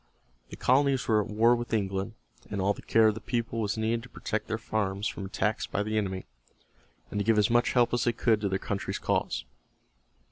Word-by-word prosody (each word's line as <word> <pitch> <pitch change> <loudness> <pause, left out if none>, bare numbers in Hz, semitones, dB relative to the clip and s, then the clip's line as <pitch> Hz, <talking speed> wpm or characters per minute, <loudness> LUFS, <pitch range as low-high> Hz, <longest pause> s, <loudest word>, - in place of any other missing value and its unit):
The - - -8
colonies 135 0 +2
were 110 -2 +4
at - - -5
war 115 +3 +4
with 120 -1 -5
England, 95 -3 -1 0.4
and 100 - -3
all 100 +2 +2
the - - -11
care 110 -1 +4
of - - 0
the 110 - -8
people 115 -1 -2
was 105 0 -1
needed 110 +1 0
to 125 - -13
protect 110 -1 -3
their 110 - -1
farms 105 -2 -2
from 100 - -5
attacks 100 +3 -1
by 105 - -1
the 110 +1 -3
enemy, 95 -3 -1 0.9
and 105 - -2
to - - +1
give 110 +1 +3
as 105 +1 +3
much 120 0 +3
help 120 -2 +3
as 120 - +1
they 120 - +3
could 115 -2 +1
to 100 - 0
their 95 - 0
country's 100 +1 -3
cause. - - -1
110 Hz, 220 wpm, -28 LUFS, 100-115 Hz, 0.9 s, were